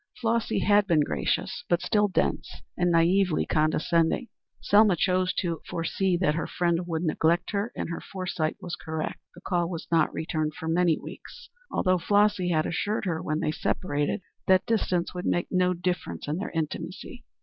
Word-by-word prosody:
Flossy 230 -1 0
had 205 -1 +4
been 165 -5 +4
gracious, 75 - -1
but 175 - +3
still 210 -1 +2
dense 190 - -2
and 175 -1 +1
naïvely 170 +1 +3
condescending. 160 +7 +1 0.3
Selma 205 -2 +5
chose 185 +1 +1
to 170 -3 -2
foresee 180 +2 0
that 170 -4 +2
her 165 - -2
friend 175 0 0
would 165 -1 -2
neglect 170 +2 +1
her, 205 +2 -1
and - - -4
her 165 - -4
foresight 180 -5 -3
was 175 - -5
correct. 160 -1 -4 0.2
The 175 - -13
call 175 -3 0
was 170 -2 -5
not 165 -2 +3
returned 155 -1 -2
for 160 - -6
many 165 0 +3
weeks, - - -11 0.2
although 185 -1 +1
Flossy 205 0 +2
had 155 -2 +2
assured 205 +5 -1
her 165 -3 -1
when 155 0 -2
they 150 - 0
separated 145 +1 -1 0.2
that 185 0 +4
distance 185 -6 0
would 180 0 -4
make 175 - 0
no 180 -1 +2
difference 175 - -3
in 150 +2 -1
their 195 - -3
intimacy. 170 +8 -5
175 Hz, 170 wpm, -27 LUFS, 160-185 Hz, 0.3 s, Selma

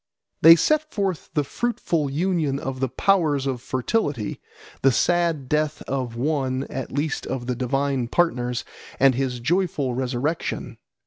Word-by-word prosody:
They 165 +1 +10
set 310 - +1
forth 195 -5 -2
the 150 - +2
fruitful 165 - -1
union 155 -2 0
of 135 -1 -5
the 130 -1 0
powers 150 -2 +2
of 130 -3 -2
fertility, 130 - -2 0.4
the 135 - +5
sad 170 -1 +1
death 150 +1 0
of 130 -3 -3
one 130 0 -1
at 135 -2 -5
least 145 +2 -2
of 120 -2 -3
the 125 0 -1
divine 135 0 0
partners, 125 -6 0 0.3
and 135 0 +6
his 125 -1 -2
joyful 150 -2 0
resurrection. 130 +5 -2
140 Hz, 140 wpm, -24 LUFS, 130-165 Hz, 0.4 s, They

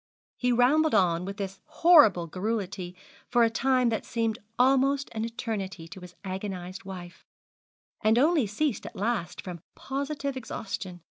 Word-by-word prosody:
He 250 0 0
rambled 270 +5 +4
on 180 -3 +2
with 195 +1 -6
this 195 -1 -5
horrible 305 - +5
garrulity 190 0 -3 0.3
for 240 -1 +4
a 225 - +3
time 255 +1 +2
that 220 - -1
seemed 230 -1 -1 0.2
almost 270 +2 +3
an 220 0 -2
eternity 200 -7 -4
to 190 - -9
his 180 0 -12
agonised 185 -1 -5
wife, 180 -2 -9 0.8
and 220 +1 +4
only 295 -2 +4
ceased 250 +5 -1
at 235 - -10
last 205 -3 -2
from 175 -3 -7
positive 280 0 -3
exhaustion. 195 -7 -5
220 Hz, 145 wpm, -28 LUFS, 185-260 Hz, 0.8 s, horrible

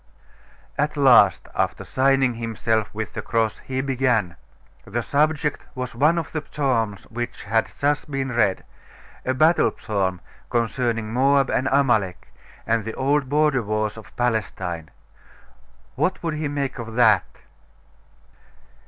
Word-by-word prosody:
At 150 +1 0
last, 120 - +5
after - - -1
signing 135 -1 +2
himself 115 -1 -1
with 110 -1 -5
the - - -4
cross, 115 -2 0
he 130 0 -3
began. 125 -9 0 0.5
The 120 +3 -3
subject 150 +1 0
was 125 -1 -4
one 150 +8 +3
of 165 - -3
the 155 -1 -3
psalms 115 -8 -1
which 120 +1 -5
had 110 +2 +1
just 145 +1 0
been 135 -2 -2
read 110 -5 +1 0.6
a 130 - 0
battle 160 +5 +4
psalm, 95 -4 -1 0.3
concerning 115 -2 -1
Moab 135 +2 +3
and 130 +2 +1
Amalek, 110 -10 +1 0.3
and 115 -1 +1
the 110 +1 -5
old 140 0 +1
border 150 -2 +2
wars 110 0 -2
of 110 - -13
Palestine. 95 -9 -2 1.0
What 185 - -1
would 165 -2 -1
he 155 0 -2
make 140 -2 -3
of 115 -1 -7
that? 110 -6 +3
125 Hz, 135 wpm, -23 LUFS, 110-140 Hz, 1.0 s, last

